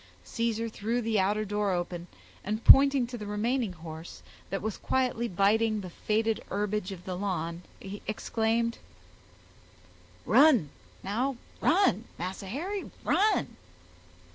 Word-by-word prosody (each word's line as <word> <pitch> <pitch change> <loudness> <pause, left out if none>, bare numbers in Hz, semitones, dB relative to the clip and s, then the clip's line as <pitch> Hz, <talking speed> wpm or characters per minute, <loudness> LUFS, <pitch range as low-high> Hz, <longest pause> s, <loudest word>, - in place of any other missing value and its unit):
Caesar 230 -1 -1
threw 225 +2 -2
the 225 -3 0
outer 205 +3 +1
door 205 0 -1
open, 175 -1 -3 0.4
and 215 +3 -3
pointing 275 -2 +8
to 240 0 -7
the 210 - -6
remaining 220 +1 -1
horse, 160 0 -10 0.3
that 195 - -2
was 220 -1 -2
quietly 250 -2 0
biting 215 +3 +2
the 185 -2 -8
faded 220 +3 0
herbage 205 0 -2
of 180 -2 -9
the 185 - -4
lawn, 175 -3 -3 0.2
he 195 +1 -8
exclaimed,— 225 +2 0 1.5
"Run—now—run—Massa 235 - +1
Harry, 365 - -4
run." 425 +1 +2
215 Hz, 115 wpm, -29 LUFS, 190-235 Hz, 1.5 s, pointing